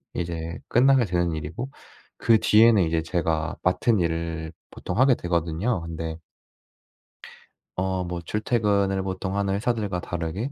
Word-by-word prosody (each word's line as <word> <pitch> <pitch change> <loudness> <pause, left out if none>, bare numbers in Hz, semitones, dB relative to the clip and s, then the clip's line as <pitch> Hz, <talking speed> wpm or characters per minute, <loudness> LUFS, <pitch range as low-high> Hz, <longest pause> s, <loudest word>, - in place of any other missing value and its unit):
이제 85 -1 -4
끝나게 130 0 +4
되는 85 -3 0
일이고 80 - -5 0.5
그 115 - +4
뒤에는 110 -2 +5
이제 80 0 0
제가 80 -2 -1
맡은 100 +4 +2
일을 80 -1 -2 0.2
보통 90 - -5
하게 130 -1 +5
되거든요. 85 +4 -1
근데 80 0 -5 1.6
어 95 0 -1
뭐 90 0 -4
출퇴근을 100 -1 0
보통 95 +1 -3
하는 100 -1 0
회사들과 105 -4 -1
다르게 90 - -4
90 Hz, 280 characters per minute, -25 LUFS, 85-105 Hz, 1.6 s, 뒤에는